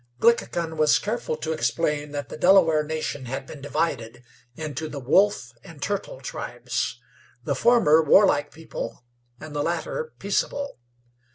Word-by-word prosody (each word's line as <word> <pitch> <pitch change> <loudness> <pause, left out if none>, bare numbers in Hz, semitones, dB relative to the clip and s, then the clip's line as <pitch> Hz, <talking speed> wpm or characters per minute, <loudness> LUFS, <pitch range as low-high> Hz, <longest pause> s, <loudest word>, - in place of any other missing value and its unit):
Glickhican 170 -8 +2
was 155 -1 +5
careful 215 -7 -3
to 160 - -3
explain 150 -2 0
that 145 -3 -4
the - - -7
Delaware 165 -3 +5
nation 155 -3 -4
had 135 +2 -4
been 140 +1 -10
divided 135 -6 -2 0.3
into 155 0 -5
the 145 - -6
Wolf 140 - +2
and 160 -3 -13
Turtle 205 - -3
tribes, - - -4 0.4
the - - 0
former 165 -11 +5
warlike 150 -2 +4
people, 160 -5 -7 0.3
and 155 -1 -9
the 145 - 0
latter 175 - -2
peaceable. 280 - -2
155 Hz, 135 wpm, -25 LUFS, 145-190 Hz, 0.4 s, was